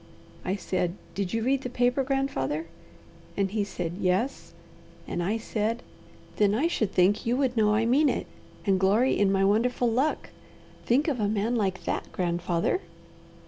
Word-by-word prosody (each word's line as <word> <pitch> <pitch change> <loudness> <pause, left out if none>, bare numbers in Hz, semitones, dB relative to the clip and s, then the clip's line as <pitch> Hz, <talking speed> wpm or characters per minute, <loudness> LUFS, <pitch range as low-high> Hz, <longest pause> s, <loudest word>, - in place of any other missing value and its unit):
I 185 - -1
said, 180 -3 -2 0.2
'Did 195 -2 -2
you 225 0 -1
read 265 +2 +1
the 250 - -4
paper, 245 +2 +1
grandfather?' 260 - -1 0.7
and 195 -1 +1
he 210 -1 0
said 175 -3 -4
'Yes'; 190 +9 0 0.6
and - - -2
I 200 +6 0
said, 225 +1 -2 0.5
'Then 205 -1 +3
I 270 +8 +1
should 220 - -1
think 185 +3 +3
you 240 +2 +2
would 265 -3 +1
know 210 -2 +3
I 225 +1 +2
mean 280 +6 +4
it, - - -1 0.4
and 195 -2 +3
glory 210 +7 +3
in 200 -1 +3
my 195 0 +3
wonderful 240 +4 +2
luck. 265 +7 0 0.6
Think 270 +6 +3
of 275 -6 0
a 210 - +1
man 215 +3 0
like 195 -4 -1
that, - - -3
grandfather!' 175 - 0
215 Hz, 170 wpm, -27 LUFS, 190-245 Hz, 0.7 s, mean